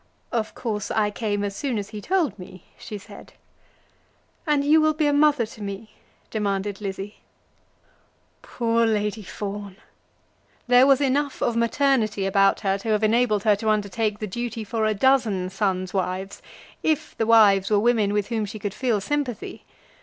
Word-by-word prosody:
"Of 225 -3 -2
course 210 -4 -3
I 210 -1 +1
came 205 -1 -2
as 200 -1 -3
soon 260 -2 -2
as 200 -1 -4
he 210 -1 -7
told 320 - 0
me," 185 0 -11 0.2
she 210 - -7
said. 200 - -13 1.1
"And 295 -2 +2
you 310 +2 +5
will 310 0 +2
be 310 -1 +1
a 290 - +2
mother 290 -4 +3
to 220 0 -13
me?" 200 +2 -6 0.4
demanded 200 -1 -2
Lizzie. 195 +1 -5 1.2
Poor 230 -1 0
Lady 210 -1 -1
Fawn! 200 0 -6 0.9
There 250 +2 +6
was 275 0 +4
enough 280 +1 0
of 235 - 0
maternity 230 -4 +1
about 195 0 +3
her 195 -1 0
to 225 - -5
have 215 0 +1
enabled 215 -2 +2
her 215 -2 +4
to 220 +1 -1
undertake 210 0 0
the 215 - -4
duty 230 +2 -4
for 220 0 -1
a 215 - 0
dozen 215 -6 +2
sons' 190 -2 -1
wives, 190 0 -3 0.4
if 310 -1 -1
the 225 - +1
wives 205 -4 +5
were 210 - +3
women 220 -2 +2
with 205 0 -1
whom 225 -2 -1
she 210 +2 -7
could 205 -2 -4
feel 230 -3 0
sympathy. 285 0 -4
215 Hz, 170 wpm, -24 LUFS, 200-240 Hz, 1.2 s, There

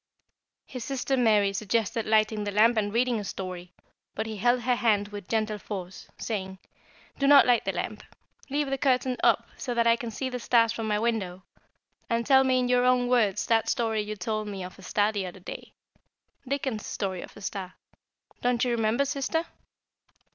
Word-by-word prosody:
His 255 -3 -7
sister 270 0 -1
Mary 210 -5 +3
suggested 220 +2 -1
lighting 215 -1 +2
the 205 - -3
lamp 220 +4 +4
and 205 -2 0
reading 240 +1 +1
a - - -5
story, 180 -2 -6 0.4
but - - -2
he 220 -1 -5
held 240 +4 +2
her 250 +1 +1
hand 210 -4 +2
with 205 -2 -8
gentle 215 -1 -1
force, 190 -2 -7
saying: 190 -4 -4 0.6
"Do 275 - +2
not 285 -1 +8
light 245 -2 +3
the - - 0
lamp. - - -4 0.5
Leave 285 0 -1
the 270 - -1
curtain 255 -1 +2
up - - +3
so 245 -3 -4
that 235 0 +2
I 230 0 +5
can 235 0 -6
see 260 +4 -4
the 250 -1 -4
stars 230 -1 +3
from 225 -1 -4
my 210 -1 +1
window, 205 -5 -2 0.7
and 230 -1 0
tell 265 -1 +6
me 260 -1 +2
in 250 -1 +1
your 245 0 +3
own 250 -1 +3
words 225 -6 +2
that 225 -1 +2
story 225 -2 0
you 210 0 -5
told 215 +2 -3
me 195 -2 -5
of 180 +2 -10
a - - -12
star 205 +3 +1
the 200 -3 -3
other 180 +1 -10
day 180 - -9 0.8
Dickens' 265 -5 -2
story 190 -3 -3
of - - -11
a - - -11
star. 190 -2 -5 0.7
Don't 245 0 +1
you 245 - 0
remember, 230 +3 +1
sister?" 280 +4 -1
225 Hz, 195 wpm, -27 LUFS, 205-250 Hz, 0.8 s, not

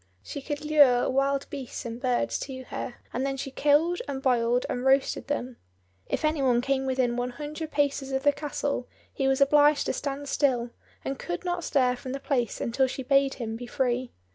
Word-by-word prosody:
She 285 - -6
could 290 +2 -5
lure 285 -5 +5
wild 275 +1 +1
beasts 270 -4 -6
and 235 +1 -6
birds 250 -2 0
to 260 -2 -6
her, 245 -1 -6 0.2
and 255 - -1
then 275 0 -1
she 270 0 -5
killed 300 +6 +3
and 275 -2 -3
boiled 245 -2 +2
and 245 - -3
roasted 270 +1 +2
them. 255 -3 -3 0.5
If - - -1
any 310 -1 +1
one 250 -3 +3
came 265 +1 0
within 255 -2 +1
one 245 0 -1
hundred 300 +4 -6
paces 280 -2 0
of 265 0 -1
the 290 - +6
castle 285 -3 -3 0.3
he 270 - 0
was 270 +1 +2
obliged 290 +1 +5
to - - 0
stand 285 0 -4
still, 245 -5 +1 0.3
and 270 0 -3
could 175 - -4
not 350 -1 -1
stir 255 -4 +2
from 255 +1 -7
the 275 - -3
place 255 -5 -1
until 260 +3 +1
she 265 +1 -5
bade 275 +1 +3
him 225 -3 -4
be 245 +1 -7
free. 250 0 -1
270 Hz, 200 wpm, -27 LUFS, 250-285 Hz, 0.5 s, the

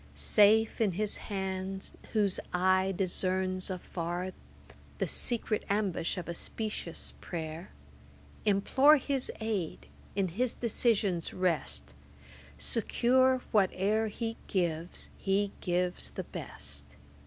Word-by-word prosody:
Safe 210 - +4
in 205 -5 +3
His 210 +3 -1
hand, 190 -1 -4 0.2
whose 205 -4 +3
eye 185 +1 +3
discerns 185 0 0
afar 180 0 -3 0.7
The - - +1
secret 230 -3 0
ambush 200 -4 0
of 180 - -4
a 170 - -2
specious 210 -2 -3
pray'r; 160 +1 -5 0.8
Implore 265 +9 +5
His 275 -1 -1
aid, 210 -7 -2 0.3
in 195 -2 +1
His 235 +8 0
decisions 210 -7 +1
rest, 180 -5 0 0.6
Secure 255 +3 +3
whate'er 210 +2 +3
He 225 +1 -4
gives 170 -3 -1
He 200 +1 +1
gives 180 0 0
the - - -5
best. 70 0 -7
195 Hz, 105 wpm, -31 LUFS, 180-220 Hz, 0.8 s, Implore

